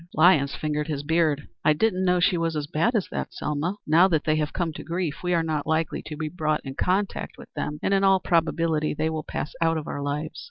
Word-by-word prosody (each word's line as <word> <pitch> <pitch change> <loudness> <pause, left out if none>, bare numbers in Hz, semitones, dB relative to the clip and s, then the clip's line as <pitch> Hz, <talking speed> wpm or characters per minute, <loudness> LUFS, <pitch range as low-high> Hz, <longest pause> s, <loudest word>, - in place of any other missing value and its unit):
Lyons 155 -4 +5
fingered 150 -1 -2
his 145 -3 -3
beard. 155 -2 +1 0.2
"I 155 - +5
didn't 190 +2 +1
know 180 -1 +3
she 180 +1 +3
was 165 -1 -1
as 150 -1 -2
bad 165 - 0
as 205 - +1
that, - - -3
Selma. 150 +6 -2
Now 165 +5 +6
that 160 -5 +1
they 155 -1 +2
have 150 -1 -1
come 170 -3 -2
to - - -8
grief, 170 -3 -2
we 180 - -1
are 165 - +2
not 155 -3 -2
likely 160 0 0
to 150 - -6
be 155 +1 -3
brought 155 -2 -1
in 135 - -5
contact 190 +7 -1
with - - -13
them, 150 - -3
and 195 - +2
in 195 0 +3
all 195 -1 +5
probability 165 -3 +1
they 160 +1 0
will 155 -1 -2
pass 150 - -5
out 165 -1 +3
of 155 - -4
our 145 - -4
lives. 145 +2 -3
160 Hz, 245 wpm, -25 LUFS, 150-175 Hz, 0.2 s, Now